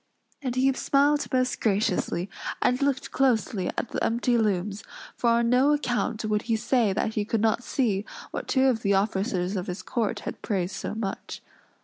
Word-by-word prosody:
And 255 -3 -3
he 265 +1 +3
smiled 285 +2 +2
most 255 -1 0
graciously, 195 -3 0 0.3
and 250 +2 +1
looked 275 -2 0
closely 225 -7 +1
at - - -2
the - - -2
empty 240 +1 +1
looms; 205 -2 0 0.3
for 235 - +1
on 235 0 +3
no 265 +4 +5
account 245 -5 -1
would 210 -1 +1
he 225 - +3
say 230 -1 +2
that 215 +3 -1
he 210 - 0
could 220 +2 -1
not 225 +1 +2
see 215 -8 0 0.3
what - - -5
two 265 -1 +3
of 250 -4 +2
the 200 -1 +2
officers 195 -1 0
of 185 -2 -3
his 180 +1 -5
court 225 -1 -1
had - - -6
praised 185 -3 -1
so - - -4
much. 205 -3 -5
225 Hz, 185 wpm, -26 LUFS, 200-255 Hz, 0.3 s, no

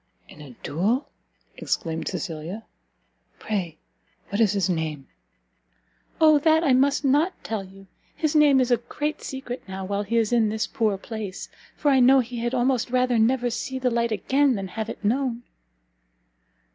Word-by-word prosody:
"In 150 - -14
a 135 -5 -12
duel?" 210 - 0 0.5
exclaimed 160 -1 -3
Cecilia, 170 +4 -5 0.7
"pray 185 -7 -3 0.5
what 200 +3 -1
is 210 -3 +4
his 195 -3 +1
name?" 160 -6 -3 1.1
"O 310 -2 +6
that 315 +2 +3
I 280 -5 +3
must 275 +3 +2
not 295 +7 +1
tell 220 -3 -3
you! 195 +1 -15 0.3
his 310 -1 -1
name 295 -3 +6
is 255 -1 +1
a 240 - +5
great 295 +6 -4
secret 265 -2 -6
now, 190 0 -5
while 200 +1 -2
he 215 +3 -1
is 225 0 +1
in 225 -3 +3
this 220 +1 -1
poor 220 -7 0
place, 210 -2 -7 0.3
for 290 - +1
I 265 - +4
know 260 +2 +6
he 245 -1 -3
had 240 +2 -1
almost 250 -1 +1
rather 250 -1 +2
never 245 +2 +2
see 260 +3 -4
the 255 -1 0
light 235 0 0
again 265 +6 +2
than 195 -2 -5
have 220 +3 -4
it 215 - -7
known." 245 +1 0
235 Hz, 170 wpm, -24 LUFS, 200-265 Hz, 1.1 s, O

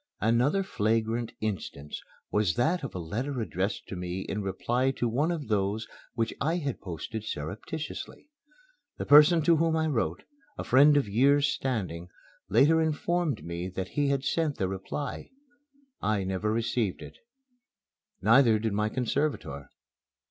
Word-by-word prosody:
Another 125 - +2
flagrant 115 - 0
instance 95 -9 -4 0.3
was 105 -5 +1
that 160 +7 +1
of 135 - -6
a - - -3
letter 120 - -3
addressed 100 -2 -2
to - - -6
me 90 +1 -4
in 105 +2 -3
reply 120 +6 0
to 130 -2 -1
one 135 +8 +1
of 165 -5 -3
those 105 +1 0 0.3
which 115 -2 -1
I 160 +4 +1
had 140 -7 -3
posted 100 +4 -6
surreptitiously. 110 - -6 0.7
The - - -4
person 150 +3 +7
to 165 +1 +4
whom 165 0 +2
I 160 0 +1
wrote, 110 - -1 0.3
a - - -3
friend 145 +3 +6
of 140 - +1
years' 140 +7 +3
standing, 95 - -3 0.4
later 160 +3 +5
informed 160 - 0
me 85 +1 -4
that 95 0 -5
he 145 -1 0
had 140 -1 0
sent 160 -3 0
the 95 - 0
reply. 95 +9 -5 0.7
I 105 -2 0
never 95 +3 -1
received 115 -3 -1
it. - - -12 1.0
Neither 115 +1 +6
did 110 -1 -2
my 105 +1 +1
conservator. 125 - -2
115 Hz, 150 wpm, -28 LUFS, 100-145 Hz, 1.0 s, person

